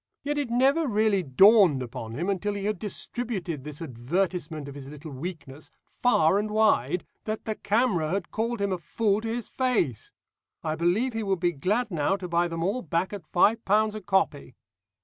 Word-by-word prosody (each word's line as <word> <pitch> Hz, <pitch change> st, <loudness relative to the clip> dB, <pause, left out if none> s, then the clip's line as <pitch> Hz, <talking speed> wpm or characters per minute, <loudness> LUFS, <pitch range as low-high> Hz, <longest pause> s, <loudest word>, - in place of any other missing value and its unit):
Yet 290 Hz, +1 st, -1 dB
it 280 Hz, -4 st, -2 dB
never 270 Hz, +6 st, +3 dB
really 215 Hz, -3 st, +2 dB
dawned 180 Hz, -, +5 dB
upon 115 Hz, -2 st, -7 dB
him 170 Hz, +8 st, -2 dB
until 200 Hz, +1 st, -1 dB
he 200 Hz, -1 st, -4 dB
had 210 Hz, -3 st, -1 dB
distributed 205 Hz, -, -4 dB
this 150 Hz, +2 st, -7 dB
advertisement 160 Hz, +3 st, -2 dB
of 140 Hz, -, -7 dB
his 140 Hz, -1 st, -9 dB
little 150 Hz, +2 st, -9 dB
weakness 150 Hz, -1 st, -8 dB, 0.3 s
far 195 Hz, -7 st, +4 dB
and 210 Hz, +1 st, -2 dB
wide, 215 Hz, -4 st, +2 dB, 0.2 s
that 215 Hz, 0 st, -4 dB
the 220 Hz, -, -1 dB
camera 210 Hz, -7 st, +1 dB
had 185 Hz, 0 st, -2 dB
called 230 Hz, +1 st, -2 dB
him 200 Hz, -1 st, 0 dB
a 185 Hz, -, -1 dB
fool 205 Hz, +4 st, 0 dB
to 225 Hz, -, -4 dB
his 230 Hz, 0 st, -3 dB
face. 225 Hz, -, -1 dB, 0.5 s
I 155 Hz, -, -1 dB
believe 175 Hz, +10 st, +1 dB
he 225 Hz, -, -2 dB
would 195 Hz, -3 st, 0 dB
be 175 Hz, 0 st, +2 dB
glad 205 Hz, -, -1 dB
now 165 Hz, +3 st, +1 dB
to 190 Hz, -2 st, -6 dB
buy 170 Hz, 0 st, +1 dB
them 165 Hz, -1 st, -3 dB
all 205 Hz, +8 st, 0 dB
back 170 Hz, +3 st, -1 dB
at 190 Hz, -6 st, -7 dB
five 220 Hz, +6 st, +3 dB
pounds 215 Hz, +2 st, +2 dB
a 215 Hz, -, -6 dB
copy. 190 Hz, -, 0 dB
195 Hz, 190 wpm, -27 LUFS, 160-220 Hz, 0.5 s, dawned